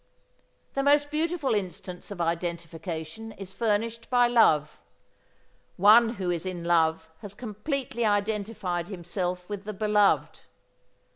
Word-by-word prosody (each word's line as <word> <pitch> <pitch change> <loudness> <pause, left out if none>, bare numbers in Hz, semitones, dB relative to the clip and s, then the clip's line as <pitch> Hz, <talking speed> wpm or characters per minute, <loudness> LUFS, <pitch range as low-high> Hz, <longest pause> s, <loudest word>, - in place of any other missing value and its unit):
The 275 - 0
most 290 +1 +3
beautiful 310 -3 0
instance 180 -2 -4
of 200 -3 -7
identification 170 +3 -4
is 190 -1 -9
furnished 230 +1 -1
by 245 -1 +5
love. 155 -11 +3 1.0
One 225 +5 +6
who 185 -3 -2
is 170 -2 -2
in 185 -2 -5
love 165 -2 +2
has 200 -1 -9
completely 240 +3 -3
identified 205 -4 -1
himself 180 -1 -4
with 205 -2 -5
the 215 +1 -5
beloved. 210 0 +2
205 Hz, 120 wpm, -27 LUFS, 175-230 Hz, 1.0 s, One